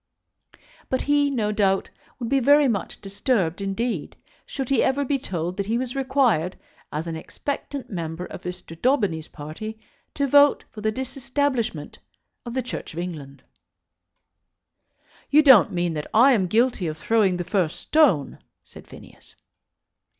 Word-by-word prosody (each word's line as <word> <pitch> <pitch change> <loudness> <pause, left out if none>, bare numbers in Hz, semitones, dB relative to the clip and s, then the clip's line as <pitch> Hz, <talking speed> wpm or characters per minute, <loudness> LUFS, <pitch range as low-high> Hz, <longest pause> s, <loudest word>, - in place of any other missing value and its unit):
But 260 - 0
he, 290 0 +2
no 220 -6 -1
doubt, 195 -2 +1 0.3
would 240 - -4
be 275 +3 +2
very 285 +3 +5
much 205 -6 -3
disturbed 195 - -1
indeed 220 +5 -3 0.3
should 270 -3 -4
he 270 -4 +3
ever 280 +2 +1
be 275 +1 0
told 175 -5 -4
that 200 -1 -2
he 230 +2 +1
was 250 0 -4
required, 260 - +1 0.3
as 155 +2 -3
an 165 -1 -4
expectant 275 - -5
member 170 -1 -4
of - - -9
Mr. 180 -2 -8
Daubeny's 205 - +1
party, 165 +9 -8 0.4
to 280 - +1
vote 285 +1 +5
for 215 - -9
the 215 +1 +1
Disestablishment 260 - -2 0.5
of 235 - -5
the 260 - 0
Church 245 - -6
of - - -4
England. 150 -6 -7 1.9
"You 305 +2 +6
don't 260 - +7
mean 175 -2 -1
that 150 -1 -4
I 250 +5 +7
am 200 -7 +2
guilty 225 -2 +1
of 155 0 -4
throwing 200 -1 +2
the 175 - -2
first 180 -3 -1
stone?" 275 - +2 0.2
said - - -15
Phineas. - - -15
220 Hz, 150 wpm, -24 LUFS, 175-265 Hz, 1.9 s, don't